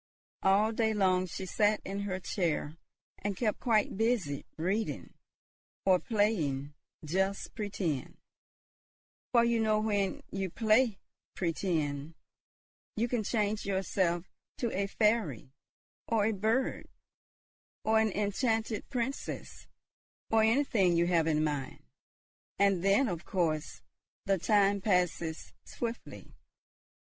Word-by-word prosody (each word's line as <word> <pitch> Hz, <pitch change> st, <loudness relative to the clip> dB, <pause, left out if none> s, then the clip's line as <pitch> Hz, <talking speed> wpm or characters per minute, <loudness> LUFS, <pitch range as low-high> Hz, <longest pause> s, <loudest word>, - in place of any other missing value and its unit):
All 200 Hz, +3 st, +4 dB
day 220 Hz, -1 st, +1 dB
long 185 Hz, -2 st, +2 dB
she 190 Hz, +2 st, -5 dB
sat 210 Hz, +2 st, +2 dB
in 195 Hz, +1 st, -4 dB
her 195 Hz, -2 st, -3 dB
chair 165 Hz, -5 st, -1 dB, 0.4 s
and 200 Hz, -2 st, -3 dB
kept 220 Hz, -4 st, 0 dB
quite 215 Hz, -5 st, +1 dB
busy 220 Hz, -, 0 dB
reading, 195 Hz, +7 st, -2 dB, 0.7 s
or 185 Hz, -2 st, +5 dB
playing 165 Hz, -, 0 dB, 0.3 s
"just 190 Hz, +5 st, -1 dB
pretend;" 185 Hz, -, -3 dB, 1.1 s
for 235 Hz, -2 st, +5 dB
you 235 Hz, -1 st, +2 dB
know 215 Hz, -1 st, +2 dB
when 205 Hz, -3 st, 0 dB
you 195 Hz, -1 st, -2 dB
play 220 Hz, +2 st, +3 dB, 0.4 s
"pretend," 160 Hz, -4 st, -1 dB, 0.8 s
you 230 Hz, +3 st, +1 dB
can 240 Hz, -2 st, -1 dB
change 210 Hz, 0 st, 0 dB
yourself 190 Hz, -2 st, 0 dB, 0.3 s
to 235 Hz, -3 st, -2 dB
a 200 Hz, +1 st, 0 dB
fairy, 210 Hz, -, 0 dB, 0.6 s
or 220 Hz, -3 st, +2 dB
a 220 Hz, -, +2 dB
bird, 220 Hz, +6 st, 0 dB, 1.0 s
or 220 Hz, 0 st, +3 dB
an 220 Hz, -1 st, +2 dB
enchanted 220 Hz, +2 st, -1 dB
princess, 255 Hz, +1 st, -4 dB, 0.6 s
or 225 Hz, 0 st, +5 dB
anything 220 Hz, -7 st, +3 dB
you 170 Hz, -, +3 dB
have 170 Hz, -2 st, +2 dB
in 155 Hz, -1 st, +2 dB
mind; 145 Hz, -3 st, -3 dB, 0.7 s
and 195 Hz, -3 st, +3 dB
then, 200 Hz, +7 st, +4 dB
of 175 Hz, -5 st, -3 dB
course, 160 Hz, -4 st, -2 dB, 0.4 s
the 195 Hz, -1 st, +2 dB
time 200 Hz, +1 st, +3 dB
passes 180 Hz, -5 st, 0 dB
swiftly. 235 Hz, -1 st, -6 dB
200 Hz, 115 wpm, -31 LUFS, 175-220 Hz, 1.1 s, or